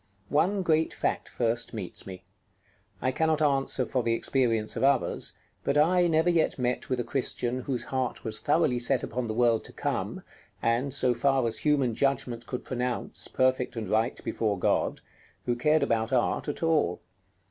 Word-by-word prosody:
One 185 Hz, +7 st, +2 dB
great 160 Hz, -2 st, +2 dB
fact -, -, -2 dB
first 115 Hz, 0 st, -1 dB
meets 100 Hz, -4 st, -6 dB
me. 95 Hz, -1 st, -9 dB, 0.8 s
I 130 Hz, -, +2 dB
cannot 160 Hz, +3 st, +1 dB
answer 135 Hz, -3 st, +2 dB
for 130 Hz, -, -1 dB
the 115 Hz, -1 st, +1 dB
experience 115 Hz, -4 st, +1 dB
of -, -, -2 dB
others, 135 Hz, -2 st, +2 dB, 0.3 s
but 145 Hz, -, +1 dB
I 175 Hz, +4 st, +4 dB
never 160 Hz, +1 st, +2 dB
yet 165 Hz, -2 st, +1 dB
met 125 Hz, -1 st, -2 dB
with 130 Hz, -1 st, 0 dB
a -, -, 0 dB
Christian 125 Hz, -1 st, -2 dB
whose 125 Hz, -1 st, -2 dB
heart 130 Hz, -2 st, -3 dB
was 110 Hz, -1 st, 0 dB
thoroughly 145 Hz, -5 st, +2 dB
set 125 Hz, +1 st, +2 dB
upon 125 Hz, +1 st, -3 dB
the 110 Hz, -, -3 dB
world 115 Hz, -2 st, +3 dB
to -, -, -8 dB
come, -, -, -3 dB, 0.4 s
and, 120 Hz, +4 st, 0 dB
so 130 Hz, -2 st, +2 dB
far 135 Hz, +1 st, +2 dB
as 115 Hz, -1 st, -1 dB
human 140 Hz, -5 st, +2 dB
judgment 125 Hz, -2 st, -1 dB
could 125 Hz, -, -5 dB
pronounce, 125 Hz, -1 st, -3 dB
perfect 130 Hz, -1 st, +1 dB
and 110 Hz, -3 st, -4 dB
right 110 Hz, +5 st, 0 dB
before 105 Hz, -3 st, -1 dB
God, -, -, 0 dB, 0.4 s
who 120 Hz, -, +1 dB
cared 150 Hz, +6 st, +2 dB
about 115 Hz, +1 st, 0 dB
art 125 Hz, +3 st, +1 dB
at 145 Hz, -, -4 dB
all. 155 Hz, -, +1 dB
125 Hz, 175 wpm, -28 LUFS, 115-145 Hz, 0.8 s, I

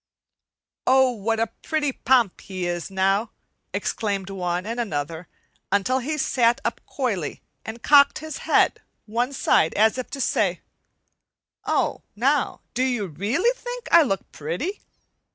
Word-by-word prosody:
"Oh, 265 Hz, 0 st, +5 dB
what 225 Hz, 0 st, -1 dB
a 225 Hz, -, +3 dB, 0.2 s
pretty 305 Hz, -3 st, 0 dB
Pomp 245 Hz, -6 st, +2 dB
he 185 Hz, -2 st, -5 dB
is 175 Hz, -1 st, -3 dB
now!" 195 Hz, +3 st, +1 dB, 0.4 s
exclaimed 200 Hz, -3 st, -2 dB
one 180 Hz, -1 st, -2 dB
and 230 Hz, +2 st, -4 dB
another, 165 Hz, -5 st, -3 dB, 0.4 s
until 205 Hz, +7 st, +2 dB
he 300 Hz, +5 st, -3 dB
sat 240 Hz, -4 st, +2 dB
up 235 Hz, -, -2 dB
coyly 205 Hz, -, -3 dB, 0.2 s
and 225 Hz, +1 st, -8 dB
cocked 285 Hz, -1 st, +6 dB
his 315 Hz, 0 st, -6 dB
head -, -, +2 dB, 0.2 s
one 240 Hz, +4 st, -1 dB
side 165 Hz, -, +2 dB
as 220 Hz, +4 st, +3 dB
if 255 Hz, -, -5 dB
to 280 Hz, -, -6 dB
say: -, -, +1 dB, 1.0 s
"Oh, -, -, 0 dB
now, 270 Hz, +5 st, +1 dB
do 250 Hz, -, -1 dB
you 245 Hz, -5 st, +1 dB
really 205 Hz, -, 0 dB
think -, -, -6 dB
I 340 Hz, -, +8 dB
look 195 Hz, -, -1 dB
pretty?" 180 Hz, -, -4 dB
230 Hz, 140 wpm, -24 LUFS, 195-265 Hz, 1.0 s, I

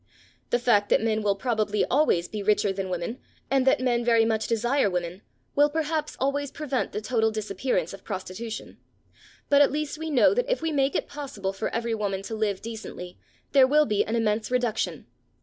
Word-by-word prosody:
The -, -, +3 dB
fact 230 Hz, -4 st, +2 dB
that -, -, +3 dB
men 220 Hz, -1 st, +1 dB
will 205 Hz, -1 st, +1 dB
probably 215 Hz, -1 st, 0 dB
always 250 Hz, -, +2 dB
be 215 Hz, -, -5 dB
richer 205 Hz, -1 st, +2 dB
than 190 Hz, -1 st, -4 dB
women, 180 Hz, +7 st, -3 dB, 0.3 s
and 270 Hz, -1 st, +2 dB
that 265 Hz, -, +5 dB
men 240 Hz, -2 st, +1 dB
very 230 Hz, -1 st, +4 dB
much 220 Hz, -1 st, 0 dB
desire 240 Hz, +1 st, +1 dB
women, 180 Hz, +1 st, -3 dB, 0.3 s
will 290 Hz, +1 st, +5 dB
perhaps 310 Hz, 0 st, -2 dB
always 280 Hz, +1 st, 0 dB
prevent 280 Hz, -3 st, -2 dB
the 210 Hz, -, -4 dB
total 220 Hz, 0 st, +1 dB
disappearance 200 Hz, -4 st, -2 dB
of 195 Hz, -, -11 dB
prostitution, 200 Hz, +3 st, -6 dB, 0.7 s
but 285 Hz, 0 st, +5 dB
at 285 Hz, -, +5 dB
least 300 Hz, +1 st, -3 dB
we 320 Hz, 0 st, -4 dB
know 255 Hz, -, +5 dB
that -, -, 0 dB
if -, -, +1 dB
we 325 Hz, 0 st, -2 dB
make 275 Hz, -2 st, +1 dB
it -, -, -1 dB
possible 265 Hz, -10 st, -5 dB
for 195 Hz, -, -3 dB
every 230 Hz, 0 st, -2 dB
woman 200 Hz, -3 st, -2 dB
to 225 Hz, -, -6 dB
live 215 Hz, -3 st, -1 dB
decently, 220 Hz, -5 st, -8 dB, 0.3 s
there 270 Hz, -2 st, +6 dB
will 300 Hz, +2 st, +4 dB
be 210 Hz, -6 st, +1 dB
an 220 Hz, -, -3 dB
immense 215 Hz, -1 st, 0 dB
reduction. 225 Hz, -, -1 dB
225 Hz, 195 wpm, -26 LUFS, 205-275 Hz, 0.7 s, there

